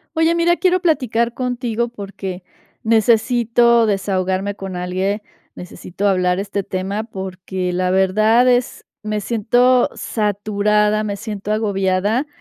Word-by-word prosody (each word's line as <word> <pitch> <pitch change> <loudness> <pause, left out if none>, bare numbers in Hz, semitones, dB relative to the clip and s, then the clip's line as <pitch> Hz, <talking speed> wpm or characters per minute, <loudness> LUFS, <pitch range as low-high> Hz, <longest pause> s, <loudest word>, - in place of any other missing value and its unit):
Oye, 325 +1 +3
mira, 340 +1 +2
quiero 370 0 +2
platicar 250 - +1
contigo 240 -2 -2
porque 195 -4 -7 0.4
necesito 235 +1 +3
desahogarme 195 -1 -1
con 195 -2 -7
alguien, 185 +4 -2 0.3
necesito 180 +2 -4
hablar 180 -1 +1
este 200 0 -3
tema 195 +4 -3
porque 190 -3 -5
la 180 +1 0
verdad 215 +6 +3
es 245 0 0 0.2
me 215 0 -2
siento 245 +4 +2
saturada, 210 0 0
me 205 -1 -3
siento 210 -1 -5
agobiada, 205 +3 0
210 Hz, 115 wpm, -19 LUFS, 190-235 Hz, 0.4 s, Oye